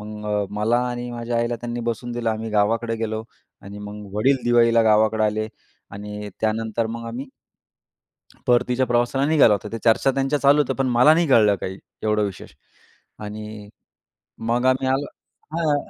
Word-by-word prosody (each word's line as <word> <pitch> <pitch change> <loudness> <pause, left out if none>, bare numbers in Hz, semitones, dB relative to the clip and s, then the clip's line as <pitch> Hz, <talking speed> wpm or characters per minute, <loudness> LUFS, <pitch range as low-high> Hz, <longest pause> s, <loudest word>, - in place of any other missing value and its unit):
मग 105 -1 -3
मला 110 +3 +1
आणि 120 0 -5
माझ्या 120 0 -3
आईला 120 0 -1
त्यांनी 120 +1 -5
बसवून 120 +1 -3
दिलं 120 -1 -1
आम्ही 110 +1 -4
गावाकडे 115 +2 +1
गेलो 110 -1 -3 0.4
आणि 100 +1 -9
मग 105 0 -8
वडील 135 +6 +3
दिवाळीला 115 -1 +4
गावाकडं 110 0 +3
आले 110 +1 0 0.4
आणि 105 +1 -7
त्यानंतर 110 +1 -1
मग 115 +1 -6
आम्ही 125 +5 -6 1.2
परतीच्या 125 +1 +2
प्रवासाला 120 +3 +1
निघालो 150 -9 +5
होतो. 105 +1 -3
त्या 115 0 -6
चर्चा 120 +4 +3
त्यांच्या 135 +2 0
चालू 140 +1 +5
होत्या. 145 - -2
पण 135 -1 0
मला 125 +5 +5
नाही 170 0 +2
कळलं 105 -6 +5
काही 95 +1 -5 0.3
एवढं 105 -1 +1
विशेष 100 -2 -8 0.7
आणि 105 0 -8 0.7
मग 120 +2 0
आम्ही 130 0 +2
आलो 135 +2 0 0.5
हां. 155 -3 +1
115 Hz, 160 wpm, -22 LUFS, 105-120 Hz, 1.2 s, निघालो